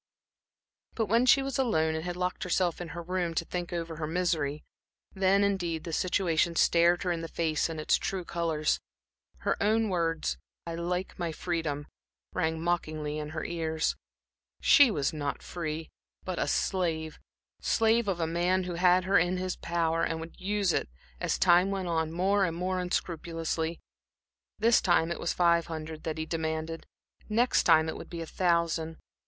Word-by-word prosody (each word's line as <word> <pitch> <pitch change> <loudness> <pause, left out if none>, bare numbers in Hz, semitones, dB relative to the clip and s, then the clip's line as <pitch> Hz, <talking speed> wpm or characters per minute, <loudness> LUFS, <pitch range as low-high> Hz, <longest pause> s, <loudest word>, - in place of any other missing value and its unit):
But 225 - +1
when 230 +5 +3
she 270 +2 +6
was 270 -1 -3
alone 160 -11 +2
and 160 0 -3
had 175 0 -3
locked 180 0 -2
herself 180 -1 0
into 175 -1 -6
her 170 - -5
room 175 -1 -2
to 170 - 0
think 175 0 -4
over 165 -2 -4
her 155 -1 -3
misery, 160 -4 -1 0.5
then, 195 +1 +3
indeed, 175 -5 0
the 165 - -6
situation 170 -2 +1
stared 170 +1 +4
her 180 - 0
in 170 -1 -2
the 165 - -4
face 160 -1 0
in 160 -1 -5
its 155 - +3
true 185 -2 -3
colors. 165 -3 0 0.6
Her - - -1
own 220 +1 +2
words, 165 - -1 0.3
"I 170 - -4
like 180 +3 -3
my 170 -2 -1
freedom," 160 -4 -2 0.5
rang 160 -2 0
mockingly 155 -3 -2
in 150 0 -5
her 155 0 -4
ears. 160 -2 -1 0.6
She 285 -4 +7
was 145 -9 0
not 145 -2 -3
free, 160 -2 -5 0.3
but 185 -2 -3
a - - 0
slave; 160 -4 -1 0.4
slave 225 0 +2
of 185 -3 -1
a 165 - +1
man 175 +3 +1
who 180 -1 -4
had 180 +1 +4
her 195 +2 +4
in 175 +2 +1
his 185 0 -2
power, 165 -1 0
and 165 -1 -1
would 165 +3 -10
use 200 -1 +1
it, - - -1 0.3
as - - 0
time 180 +1 +5
went 195 -2 -2
on, 160 -1 0
more 195 +4 +2
and 165 -1 -3
more 185 +1 -1
unscrupulously. 165 -2 -2 0.8
This 230 +2 +4
time 170 -2 +3
it - - -3
was 170 - -1
five 170 -1 +3
hundred 160 -1 -6
that 160 -1 -2
he 160 - -2
demanded; 160 0 -3 0.4
next 235 +4 +3
time 160 0 +5
it 160 - -3
would - - -9
be 170 -1 -5
a - - -4
thousand. 165 -2 0
170 Hz, 180 wpm, -29 LUFS, 160-185 Hz, 0.8 s, She